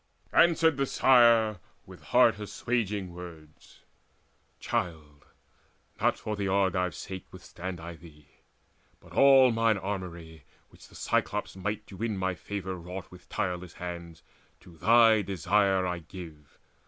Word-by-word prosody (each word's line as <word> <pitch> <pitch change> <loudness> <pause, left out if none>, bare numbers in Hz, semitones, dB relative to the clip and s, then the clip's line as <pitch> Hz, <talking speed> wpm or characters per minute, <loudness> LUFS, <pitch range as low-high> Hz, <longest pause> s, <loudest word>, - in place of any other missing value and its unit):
Answered 165 -3 +4
the 135 -1 0
Sire 115 -6 +4 0.3
with - - -14
heart 115 -4 +4
assuaging 105 -3 -3
words: 85 -3 -13 0.8
"Child, 75 -4 -4 0.8
not - - +2
for 110 - -4
the 100 -1 -2
Argives' 95 -2 0
sake 95 -2 -8
withstand 90 0 -8
I 85 +1 -8
thee; 75 -2 -17 0.7
But 85 -1 -17
all 135 +2 +6
mine 115 -2 +2
armoury 85 -5 -6 0.3
which - - -17
the - - -19
Cyclops' - - -1
might 105 +3 -4
To 95 - -12
win 110 -1 -2
my 95 0 -1
favour 95 0 -5
wrought 90 +2 -8
with 90 - -16
tireless 90 -1 -3
hands, 85 -2 -8 0.4
To 90 -2 -16
thy 110 +4 +5
desire 95 +1 +1
I 90 -1 -2
give. 80 -3 -12
95 Hz, 130 wpm, -28 LUFS, 85-110 Hz, 0.8 s, all